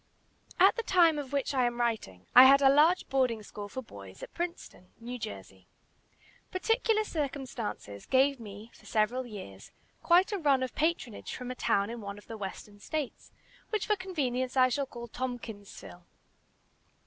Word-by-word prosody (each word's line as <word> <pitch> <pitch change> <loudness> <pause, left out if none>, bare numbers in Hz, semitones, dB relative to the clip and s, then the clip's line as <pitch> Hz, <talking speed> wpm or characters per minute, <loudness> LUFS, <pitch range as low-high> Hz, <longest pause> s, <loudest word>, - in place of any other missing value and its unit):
At 385 +6 +6
the - - 0
time 340 -7 +4
of 280 -2 -6
which 280 0 -1
I 255 -2 +2
am 240 0 -2
writing, 215 - -2
I 255 +1 +11
had 275 +1 +8
a 270 0 +7
large 320 +6 +4
boarding 250 -5 0
school 205 0 -8
for 260 +5 -6
boys, 100 - -12
at - - -9
Princeton, 340 - -6
New 245 +2 -6
Jersey. 95 - -8 0.8
Particular 445 +3 +1
circumstances 260 - -5
gave 270 +1 +3
me, 210 +1 -10
for - - -18
several 240 +4 0
years, 100 - -10 0.3
quite 355 +4 +4
a 405 - -1
run 280 -5 +3
of 255 - -4
patronage 310 -8 -2
from 250 0 -6
a - - -5
town 200 -2 +1
in 235 -1 -7
one 200 0 -7
of 205 - -14
the 225 - -8
Western 205 0 -8
States, 300 +4 -5 0.4
which 430 -2 -1
for 425 - +2
convenience 270 -10 -2
I 255 0 +6
shall 275 +2 -1
call 235 -2 -8
Tompkinsville. 225 -8 -7
255 Hz, 170 wpm, -30 LUFS, 210-295 Hz, 0.8 s, I